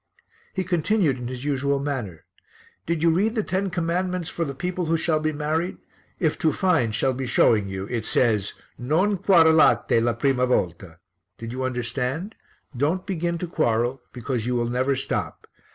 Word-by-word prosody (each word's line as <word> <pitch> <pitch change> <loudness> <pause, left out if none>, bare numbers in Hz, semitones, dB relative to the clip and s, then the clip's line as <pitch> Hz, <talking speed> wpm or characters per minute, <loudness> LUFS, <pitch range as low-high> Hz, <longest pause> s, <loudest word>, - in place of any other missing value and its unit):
He 190 - 0
continued 175 - +1
in 120 - -5
his 125 +1 -6
usual 140 0 0
manner, 130 - -4 0.6
"Did 165 -1 -1
you 165 - +5
read 210 +7 +1
the 215 - +1
ten 190 +1 -1
commandments 180 0 -1
for 170 - -2
the 140 -4 -4
people 180 +3 -3
who 165 +1 +2
shall 155 -1 +1
be 155 0 0
married? 155 +4 -2 0.4
If 160 -5 0
to 160 - +2
find, 160 - +1
shall 130 +3 +1
be 130 0 -4
showing 105 -4 +3
you. 95 0 -4
It 115 +1 -3
says, 110 -4 +1 0.2
'Non 175 +10 +1
quarelate 160 - +5
la 120 0 +1
prima 125 +1 +1
volta.' 90 -7 -1 0.4
Did 115 0 -7
you 130 +1 -4
understand? 130 - -2 0.4
'Don't 155 +9 0
begin 170 -2 -2
to 180 - -4
quarrel,' 125 -5 0
because 125 -2 -3
you 125 - 0
will 120 -1 0
never 130 +3 +1
stop. 135 +1 -3
140 Hz, 170 wpm, -24 LUFS, 125-170 Hz, 0.6 s, you